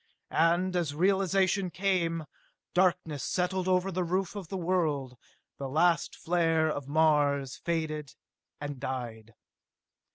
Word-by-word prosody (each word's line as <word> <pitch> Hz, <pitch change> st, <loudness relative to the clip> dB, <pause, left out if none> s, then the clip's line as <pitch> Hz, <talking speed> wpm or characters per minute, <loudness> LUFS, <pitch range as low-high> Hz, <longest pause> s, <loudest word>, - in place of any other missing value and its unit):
And 175 Hz, +3 st, +2 dB
as 165 Hz, -5 st, -1 dB
realization 190 Hz, +1 st, +2 dB
came, 170 Hz, -2 st, 0 dB, 0.5 s
darkness 175 Hz, -5 st, +1 dB
settled 185 Hz, 0 st, -1 dB
over 185 Hz, +1 st, +2 dB
the 185 Hz, 0 st, -1 dB
roof 185 Hz, +3 st, -1 dB
of 195 Hz, -4 st, -6 dB
the 190 Hz, -, -4 dB
world; 160 Hz, -8 st, 0 dB, 0.4 s
the 135 Hz, -1 st, -4 dB
last 170 Hz, +4 st, +2 dB
flare 165 Hz, -2 st, +1 dB
of 145 Hz, -2 st, -5 dB
Mars 145 Hz, -3 st, +2 dB
faded 155 Hz, -4 st, -3 dB, 0.4 s
and 145 Hz, -2 st, -5 dB
died. 115 Hz, -4 st, -5 dB
165 Hz, 120 wpm, -29 LUFS, 145-185 Hz, 0.5 s, And